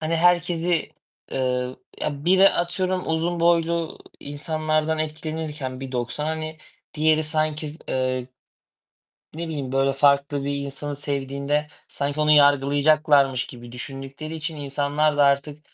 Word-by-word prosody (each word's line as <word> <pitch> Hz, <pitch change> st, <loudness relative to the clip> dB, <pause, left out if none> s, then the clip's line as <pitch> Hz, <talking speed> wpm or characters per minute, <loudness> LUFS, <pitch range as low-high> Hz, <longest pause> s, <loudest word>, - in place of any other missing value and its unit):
hani, 160 Hz, +1 st, 0 dB
herkesi, 175 Hz, -1 st, +2 dB, 0.4 s
eee, 125 Hz, -1 st, -1 dB, 0.2 s
ya 145 Hz, -1 st, -3 dB
biri 190 Hz, +2 st, +6 dB
atıyorum 185 Hz, +1 st, -1 dB
uzun 165 Hz, +1 st, 0 dB
boylu 170 Hz, -1 st, +1 dB, 0.2 s
insanlardan 155 Hz, +2 st, -1 dB
etkilenirken 155 Hz, -4 st, -4 dB
1.90 130 Hz, +2 st, -3 dB
hani, 155 Hz, 0 st, -4 dB, 0.4 s
diğeri 155 Hz, 0 st, +3 dB
sanki, 155 Hz, -1 st, -1 dB
eee 130 Hz, -1 st, -1 dB, 1.1 s
ne 170 Hz, +1 st, -4 dB
bileyim, 140 Hz, -5 st, -4 dB
böyle, 135 Hz, 0 st, +2 dB
farklı 140 Hz, 0 st, +2 dB
bir 140 Hz, 0 st, -1 dB
insanı 140 Hz, +1 st, -4 dB
sevdiğinde, 140 Hz, +1 st, -1 dB, 0.2 s
sanki 145 Hz, +1 st, -2 dB
onu 150 Hz, 0 st, +3 dB
yargılayacaklarmış 145 Hz, -1 st, +4 dB
gibi 120 Hz, -1 st, -11 dB
düşündükleri 135 Hz, +4 st, -7 dB
için 160 Hz, 0 st, -4 dB
insanlar 145 Hz, +1 st, 0 dB
da 145 Hz, -, +5 dB
artık, 140 Hz, +1 st, +1 dB
150 Hz, 120 wpm, -24 LUFS, 140-160 Hz, 1.1 s, biri